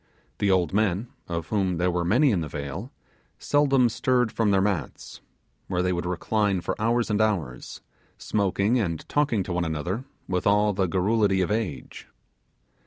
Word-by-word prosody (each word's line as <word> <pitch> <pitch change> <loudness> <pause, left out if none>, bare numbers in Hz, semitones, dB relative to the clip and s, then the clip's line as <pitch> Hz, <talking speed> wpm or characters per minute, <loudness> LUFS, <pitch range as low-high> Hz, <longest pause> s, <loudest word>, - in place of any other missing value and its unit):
The 100 - +1
old 90 -3 +2
men, 105 +2 0 0.2
of 85 -2 -4
whom 95 -4 0
there 90 +1 +1
were 90 0 -1
many 125 - +3
in 95 -5 +1
the 80 - -3
vale, 75 - -6 0.5
seldom 140 -4 +3
stirred 125 0 +1
from 115 -2 +1
their 100 -1 +3
mats, 95 -4 -3 0.5
where 90 -1 -1
they 90 0 +1
would 85 0 -3
recline 100 +2 0
for 85 - -2
hours 115 0 +1
and 105 +1 +2
hours, 85 -13 -2 0.4
smoking 100 +3 0
and 85 -7 -3
talking 140 -9 +1
to 90 - -4
one 90 0 0
another 85 - -3 0.2
with 90 0 -1
all 105 +1 +3
the 95 -1 0
garrulity 100 +2 +2
of 90 - -1
age. 105 - -4
100 Hz, 170 wpm, -25 LUFS, 90-110 Hz, 0.5 s, many